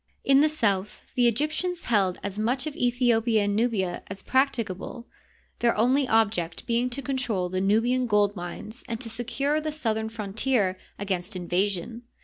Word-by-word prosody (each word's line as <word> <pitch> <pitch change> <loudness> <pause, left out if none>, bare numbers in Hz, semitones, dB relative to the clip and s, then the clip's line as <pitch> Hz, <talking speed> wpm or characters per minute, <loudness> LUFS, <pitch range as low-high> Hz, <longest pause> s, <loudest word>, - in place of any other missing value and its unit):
In 275 0 +5
the 310 - +4
south 210 -9 0
the 245 -2 +4
Egyptians 310 +9 -1
held 195 -6 +1
as 200 +1 -3
much 245 +6 0
of 310 - -4
Aethiopia 240 -4 +2
and 205 0 0
Nubia 210 -6 0
as 195 0 -6
prac 265 +2 +3
ticable, 230 +1 -5 0.5
their 235 -2 +2
only 255 +5 +3
object 205 -8 +1
being 240 +1 +1
to 270 +3 -5
control 245 -9 -1
the 185 +1 -1
Nubian 235 +6 +2
gold 205 -1 +3
mines 190 +6 -7
and 230 -1 -3
to 235 -3 -6
secure 275 +6 -1
the 310 0 -2
southern 220 -7 -1
frontier 215 -1 0 0.2
against 190 -2 -3
in 180 -1 -5
vasion. 195 +5 -1
225 Hz, 165 wpm, -26 LUFS, 200-255 Hz, 0.5 s, In